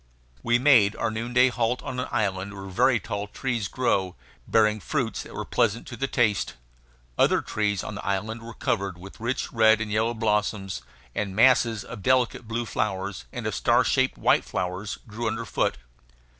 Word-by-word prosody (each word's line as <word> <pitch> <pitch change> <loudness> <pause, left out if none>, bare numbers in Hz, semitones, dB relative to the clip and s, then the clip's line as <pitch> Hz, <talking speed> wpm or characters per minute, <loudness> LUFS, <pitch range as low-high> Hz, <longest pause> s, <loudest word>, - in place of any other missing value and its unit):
We 120 0 +3
made 120 -6 +5
our 110 - -1
noonday 120 +3 +2
halt 120 0 -1
on 125 -1 -4
an 125 - -2
island 100 -1 -1
where 100 0 -8
very 115 +6 +2
tall 100 -2 -4
trees 120 -1 -2
grew, 95 -8 0 0.3
bearing 110 -1 +3
fruits 125 -1 -2
that - - -11
were - - -4
pleasant 115 -2 +1
to 120 - -6
the 135 +2 -2
taste. 110 -6 +1 0.6
Other - - +4
trees 105 -3 -1
on - - -5
the 100 - -7
island 110 +4 -2
were 115 -1 -9
covered 100 -5 -1
with 95 +2 -12
rich 120 +4 -2
red 110 -1 +5
and 110 -1 -3
yellow 110 +3 +1
blossoms; 105 - -1 0.3
and 100 -2 -3
masses 115 -2 +4
of - - -9
delicate 125 -1 +1
blue 115 +1 -2
flowers 95 - -3
and - - -6
of - - -1
star - - +3
shaped 130 0 +1
white - - +3
flowers 95 +3 -3
grew 115 +2 -4
underfoot. 110 - -1
110 Hz, 175 wpm, -26 LUFS, 100-120 Hz, 0.6 s, made